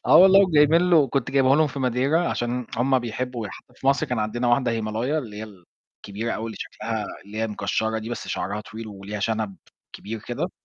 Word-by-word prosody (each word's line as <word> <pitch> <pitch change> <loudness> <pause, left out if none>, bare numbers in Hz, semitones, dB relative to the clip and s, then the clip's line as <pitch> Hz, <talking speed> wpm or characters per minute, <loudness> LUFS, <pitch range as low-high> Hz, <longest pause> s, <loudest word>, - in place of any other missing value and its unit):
آه - - +7
والله 190 +3 +8
وجايبين 165 -1 +4
له 155 -6 +5
كنت 135 -1 -1
جايبه 135 0 +4
لهم 155 - +4
في 140 -1 -6
ماديرا 135 +7 +1
عشان 120 0 -2
هُم 130 +3 +3
بيحبوا 120 -1 -4
يح 95 - -9
في - - -7
مصر 135 0 +3
كان 125 - -2
عندنا 115 +3 -1
واحدة 120 0 +3
هيمالايا، 115 +6 -1
اللي 115 -8 -6
هي 110 - -5
ال 95 -5 -15 0.4
كبيرة 110 +4 -4
أوي 110 - -3
اللي 110 - -7
شكلها 110 -2 -4 0.2
اللي 105 +2 -8
هي 110 - +1
مكشرة 110 +1 -1
دي 110 +1 -6
بس 120 - -5
شعرها 100 +2 -2
طويل 110 +1 -8
وليها 100 0 -7
شنب 110 -3 -1 0.4
كبير 110 +1 -6
كده. - - -3
115 Hz, 210 wpm, -24 LUFS, 110-135 Hz, 0.4 s, والله